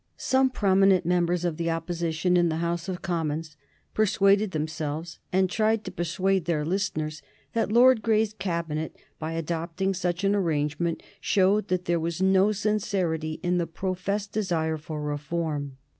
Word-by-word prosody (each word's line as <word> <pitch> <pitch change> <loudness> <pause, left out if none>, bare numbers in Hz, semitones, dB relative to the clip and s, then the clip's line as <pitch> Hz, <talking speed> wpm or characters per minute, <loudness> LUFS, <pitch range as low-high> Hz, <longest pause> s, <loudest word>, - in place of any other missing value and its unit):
Some 265 0 +2
prominent 195 -5 +3
members 175 0 +1
of 165 -3 -1
the 170 0 -1
Opposition 165 +1 0
in 175 -1 +4
the 160 - -1
House 170 +2 -2
of 180 -1 -5
Commons 160 -3 -2 0.4
persuaded 200 0 +3
themselves, 155 0 -4
and 190 0 +3
tried 220 +2 +1
to - - -6
persuade 185 +1 0
their 155 -3 0
listeners, 155 -4 -2 0.3
that 225 -2 0
Lord 245 0 +6
Grey's 220 -1 +2
Cabinet, 170 -6 -3 0.2
by 160 +1 -3
adopting 165 +3 -2
such 180 0 -2
an 200 0 +3
arrangement, 165 -3 0 0.2
showed 200 +2 +2
that 180 0 -1
there 170 0 +1
was 165 0 -3
no 190 +2 +4
sincerity 190 -7 -1
in 175 0 +1
the 170 - -1
professed 190 +4 -3
desire 165 -6 0
for 155 0 -6
reform. 150 -1 -3
175 Hz, 150 wpm, -26 LUFS, 160-195 Hz, 0.4 s, Lord